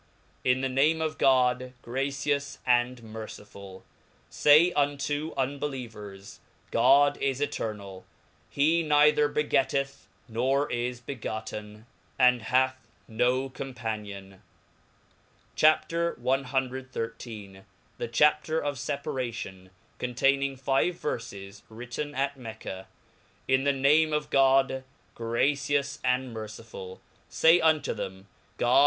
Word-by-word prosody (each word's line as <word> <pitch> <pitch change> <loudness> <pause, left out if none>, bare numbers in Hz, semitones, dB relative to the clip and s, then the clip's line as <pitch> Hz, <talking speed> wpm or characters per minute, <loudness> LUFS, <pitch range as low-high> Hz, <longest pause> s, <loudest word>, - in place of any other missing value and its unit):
TN 125 0 +2
the 135 - +1
name 140 +5 +2
of 155 -2 -2
God, 125 -1 +3
gracious 140 +3 -2
and 125 0 +2
merciftiU 105 -3 -10 0.5
Say 155 +4 +6
unto 145 +1 0
• - - -12
1 130 - +1
unbelievers, 110 -9 -7 0.3
God 140 +4 +5
is 135 -1 -1
eternall, 100 -9 -4 0.4
he 160 +4 +2
neither 150 -1 +4
begettcth, 140 -2 0 0.2
noi 130 +5 +1
is 120 +1 -2
begotten, 110 -3 -6 0.3
and 125 -2 +5
hath 130 +3 +2 0.3
no 125 +3 +1
companion. 105 -7 -6 1.1
CHAP. 155 0 +4
CXIII. 170 0 -1 0.8
r%e 115 -4 -6 0.5
Chapter 150 +5 +3
of 145 -2 -2
Separation^ 125 -10 -4 0.3
containing 135 +2 +1
five 135 +6 +1
Verfes. 100 - -6
\^ritten 125 +6 -6
at 140 +1 -1
Mecca. 110 -6 -8 0.6
TN 130 +1 +2
the 140 - +4
name 150 +3 +3
of 150 0 -2
God, 135 -1 +3 0.3
gracions 140 +4 0
and 125 -1 0
•nercj.l] 110 -3 -8 0.3
Say 165 +2 +5
unto 160 -2 +2
^rhem 95 0 -6 0.3
God. 120 +2 +4
130 Hz, 105 wpm, -28 LUFS, 115-145 Hz, 1.1 s, Say